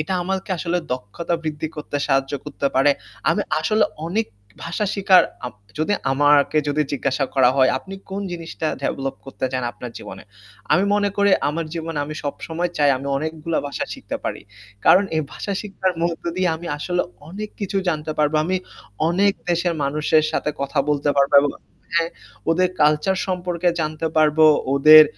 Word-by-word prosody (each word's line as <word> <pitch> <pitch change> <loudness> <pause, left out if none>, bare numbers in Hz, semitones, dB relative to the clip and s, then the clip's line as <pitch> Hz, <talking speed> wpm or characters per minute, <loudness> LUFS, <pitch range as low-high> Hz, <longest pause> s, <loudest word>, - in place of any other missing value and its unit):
এটা 155 +5 -2
আমাকে 190 +2 -3
আসলে 170 +2 -1 0.2
দক্ষতা 130 +9 -3
বৃদ্ধি 155 0 -3
করতে 150 -1 -4
সাহায্য 135 0 +1
করতে 150 -1 -3
পারে। 135 +2 +5 0.4
আমি - - +1 0.2
আসলে 215 +7 +3 0.2
অনেক 215 +6 0 0.4
ভাষা 170 +5 -2
শিখার, 190 -2 +6 0.2
আপ - - -8 0.2
যদি 160 +6 +1 0.2
আমাকে 145 +2 +4
যদি 150 +1 +2
জিজ্ঞাসা 140 0 0
করা 130 -2 +5
হয় 130 -1 +5
আপনি 195 - -10 0.2
কোন 195 - -3
জিনিসটা 165 -2 -5 0.2
ডেভেলপ 135 0 -2
করতে 135 -1 -3
চান 130 - -1
আপনার 125 - -8
জীবনে? - - -9 0.5
আমি 185 - +4
মনে 205 0 +2
করি 200 0 +4 0.2
আমার 160 +2 -2
জীবনে 165 -2 -4
আমি 155 +1 -6
সবসময় 165 +4 -3
চাই 145 -1 +5
আমি 135 +2 -6
অনেকগুলা 160 +2 -2
ভাষা 140 - -3
শিখতে - - -5
পারি। - - -3 0.4
কারণ 195 +3 +6
এই 155 - +2
ভাষা 200 - -4
শিখার 195 -3 -1
মধ্য 170 -1 -1
দিয়ে 185 -1 +2
আমি 170 +1 -9
আসলে 180 +4 0 0.3
অনেক 210 +5 -6
কিছু 200 -1 -2
জানতে 155 -1 -1
পারবো। 150 0 +2
আমি 185 +3 0 0.5
অনেক 195 +4 +3 0.2
দেশের 175 0 +1
মানুষের 150 +2 +2
সাথে - - 0
কথা 140 +1 -2
বলতে 145 0 +1
পারবো 140 0 +3
এবং 145 - +1 0.5
হ্যাঁ, 165 0 +2 0.4
ওদের 180 +2 +3
কালচার 150 +6 +3
সম্পর্কে 180 -1 -1
জানতে 155 +1 -2
পারব, 155 0 +3 0.4
ওদের 155 +2 +9
160 Hz, 165 wpm, -22 LUFS, 145-180 Hz, 0.5 s, ওদের